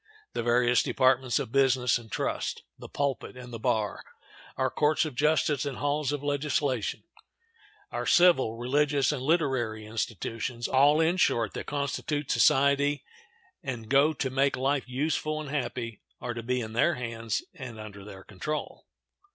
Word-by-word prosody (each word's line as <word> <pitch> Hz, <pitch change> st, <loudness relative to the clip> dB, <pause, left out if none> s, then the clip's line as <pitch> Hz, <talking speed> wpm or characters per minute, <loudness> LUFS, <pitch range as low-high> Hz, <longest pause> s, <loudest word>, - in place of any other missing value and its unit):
The -, -, -1 dB
various 120 Hz, +1 st, +3 dB
departments 130 Hz, -1 st, +2 dB
of -, -, -3 dB
business 130 Hz, -2 st, +3 dB
and 110 Hz, -3 st, -15 dB
trust, -, -, -2 dB
the -, -, -11 dB
pulpit 140 Hz, -2 st, -2 dB
and 125 Hz, -1 st, -10 dB
the 115 Hz, -, -5 dB
bar, 105 Hz, -2 st, -1 dB, 0.5 s
our 130 Hz, -1 st, +1 dB
courts 150 Hz, +1 st, +2 dB
of 155 Hz, -, -5 dB
justice 150 Hz, 0 st, +2 dB
and 140 Hz, -3 st, -4 dB
halls 145 Hz, 0 st, 0 dB
of 145 Hz, -1 st, -3 dB
legislation, 145 Hz, -4 st, -1 dB, 0.9 s
our -, -, -3 dB
civil, 165 Hz, -11 st, +4 dB
religious, 140 Hz, +4 st, +2 dB
and 145 Hz, -4 st, -3 dB
literary 130 Hz, -8 st, 0 dB
institutions, 115 Hz, +2 st, -3 dB
all, 145 Hz, +3 st, +4 dB
in 165 Hz, +3 st, +2 dB
short, 115 Hz, -, +2 dB
that -, -, -6 dB
constitute 145 Hz, 0 st, -2 dB
society 140 Hz, 0 st, +3 dB, 0.6 s
and 115 Hz, -4 st, -5 dB
go 140 Hz, +3 st, +5 dB
to 135 Hz, -3 st, -3 dB
make 135 Hz, +1 st, +2 dB
life 135 Hz, 0 st, 0 dB
useful 155 Hz, +3 st, -1 dB
and 150 Hz, -2 st, -6 dB
happy, 120 Hz, -5 st, -3 dB, 0.2 s
are 120 Hz, -, -4 dB
to 115 Hz, -, -5 dB
be 125 Hz, +2 st, -1 dB
in 110 Hz, -1 st, -6 dB
their 140 Hz, +8 st, +3 dB
hands 115 Hz, -2 st, -3 dB
and 120 Hz, -4 st, -8 dB
under 105 Hz, -2 st, -9 dB
their 95 Hz, -1 st, -11 dB
control. 110 Hz, +11 st, -5 dB
130 Hz, 155 wpm, -28 LUFS, 120-145 Hz, 0.9 s, go